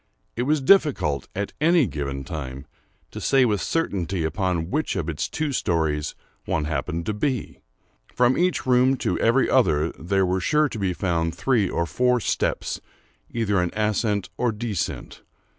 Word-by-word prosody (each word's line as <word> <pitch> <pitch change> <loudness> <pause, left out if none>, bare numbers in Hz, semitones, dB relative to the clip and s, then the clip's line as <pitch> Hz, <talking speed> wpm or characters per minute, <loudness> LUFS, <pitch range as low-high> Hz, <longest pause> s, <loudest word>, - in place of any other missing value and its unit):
It 120 - -2
was 155 -1 +2
difficult, 135 - +3
at 100 +1 -3
any 165 -1 +5
given 70 -6 -4
time, 70 -3 -6 0.5
to - - -7
say 135 -2 +4
with 105 -4 0
certainty 95 - -1
upon 85 0 -1
which 155 - -1
of - - -2
its - - -2
two 155 -2 -2
stories 80 - 0 0.3
one 80 - -1
happened 85 +2 -3
to 110 - -1
be. 125 +3 -2 0.5
From 125 +1 +3
each 180 -2 +1
room 130 +1 +4
to - - -1
every 120 +4 +3
other 80 - +3
there 95 +3 0
were 90 +1 0
sure 150 +9 +3
to 115 - -6
be 95 -2 0
found 85 -3 -1
three 110 -2 +1
or 85 - 0
four 125 +10 +2
steps - - -1 0.5
either 105 -5 0
in 90 - 0
ascent 105 -1 0
or 125 -1 +1
descent. 105 -4 -4
100 Hz, 160 wpm, -24 LUFS, 85-125 Hz, 0.5 s, any